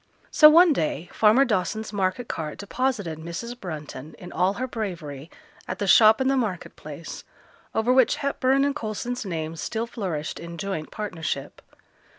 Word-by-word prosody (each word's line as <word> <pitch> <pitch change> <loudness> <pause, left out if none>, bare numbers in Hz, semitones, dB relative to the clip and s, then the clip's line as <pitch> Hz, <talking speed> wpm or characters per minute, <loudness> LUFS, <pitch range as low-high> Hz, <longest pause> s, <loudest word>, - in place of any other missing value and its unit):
So 305 - +9
one 335 +1 +7
day 165 - -2
farmer 225 +6 +5
Dawson's 215 -1 -1
market 200 +4 -1
cart 155 -2 -4
deposited 205 -6 -2
Mrs. 170 +9 -6
Brunton 155 - -7
in 180 - -10
all 185 +3 +1
her 255 +5 -3
bravery 170 - -5 0.4
at 185 - -4
the 205 - -2
shop 215 +2 +7
in 265 - +1
the 270 - +3
market 215 -9 -2
place, 155 +2 -9 0.5
over 230 +3 +3
which 260 -2 +4
Hepburn 275 -1 +1
and 285 0 0
Coulson's 240 0 -4
names 160 -3 -4
still 225 0 -2
flourished 180 -10 -4
in 170 0 -8
joint 190 -4 -4
partnership. 165 -10 -4
200 Hz, 160 wpm, -25 LUFS, 165-245 Hz, 0.5 s, So